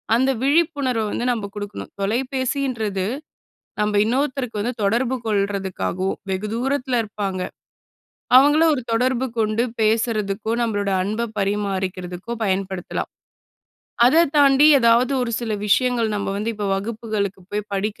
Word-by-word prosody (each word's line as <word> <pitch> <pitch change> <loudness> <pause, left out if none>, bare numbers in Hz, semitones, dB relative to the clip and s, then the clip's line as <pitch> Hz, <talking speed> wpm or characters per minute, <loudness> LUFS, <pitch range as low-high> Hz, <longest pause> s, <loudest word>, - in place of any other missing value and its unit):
அந்த 260 +3 +2
விழிப்புணர்வை 280 -5 +1
வந்து 240 - -2
நம்ப 220 -4 -2
குடுக்கணும். 205 0 -6
தொலைபேசின்றது 250 -2 -1 0.7
நம்ப 210 0 +1
இன்னொருத்தருக்கு 255 -2 -1
வந்து 245 +4 -2
தொடர்பு 240 +5 +1
கொள்றதுக்காகவும் 195 -2 -1
வெகு 190 +3 -2
தூரத்தில 255 0 0
இருப்பாங்க, 200 -3 -4 1.0
அவங்கள 290 +4 +5
ஒரு 255 - -2
தொடர்பு 255 +2 +1
கொண்டு 215 +1 +1 0.2
பேசறதுக்கோ, 215 -1 0
நம்பளோட 205 -3 -1
அன்பை 215 +4 -2
பரிமாறிக்கிறதுக்கோ 195 0 -2
பயன்படுத்தலாம். 190 -2 -2 1.0
அத 325 +6 +5
தாண்டி 280 0 +6
எதாவது 235 +2 +4
ஒரு 240 - -2
சில 225 -2 -3
விஷயங்கள், 240 +1 +2
"நம்ப 200 - -2
வந்து 215 +3 -2
இப்ப 205 -1 -3
வகுப்புகளுக்கு 210 -2 -3
போய் 210 0 -3
படிக்க 200 +2 -2
220 Hz, 115 wpm, -22 LUFS, 200-255 Hz, 1.0 s, தாண்டி